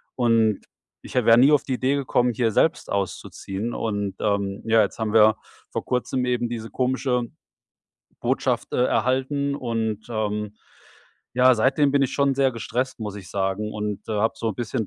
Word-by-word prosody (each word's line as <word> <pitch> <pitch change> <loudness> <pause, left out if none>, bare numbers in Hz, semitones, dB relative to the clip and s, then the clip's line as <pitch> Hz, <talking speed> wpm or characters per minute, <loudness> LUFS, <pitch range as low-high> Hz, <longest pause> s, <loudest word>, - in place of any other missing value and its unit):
und 115 -4 +2 0.4
ich - - -10
wäre 115 -2 +5
nie 135 +4 +6
auf 145 - +4
die 130 - -3
Idee 130 +3 +1
gekommen, 125 -3 +1
hier 115 -1 +1
selbst 160 - +1
auszuziehen. 100 +2 -4
Und, 105 -3 -2
ähm, 100 -1 -1
ja, 115 0 +4
jetzt 100 - -4
haben 110 -2 -1
wir 110 0 +6 0.4
vor - - -3
Kurzem 125 0 -1
eben 125 -1 0
diese 115 -1 -5
komische 130 -1 0 1.0
Botschaft, - - -1
äh, 125 - +2
erhalten 135 +3 0
und, 110 -3 -3
ähm, 105 -1 -2 0.8
ja, 130 +1 +6
seitdem 135 +5 +3
bin 140 -1 +3
ich 130 - 0
schon 140 -1 +2
sehr 135 -2 +2
gestresst, 125 +2 -3
muss 105 -2 -5
ich 95 -3 -10
sagen, 100 +2 -2
und, 105 -1 -3
äh, - - -2
habe 110 +2 +1
so 115 - -2
'n 105 - -7
bisschen 115 -2 -2
115 Hz, 175 wpm, -24 LUFS, 105-130 Hz, 1.0 s, nie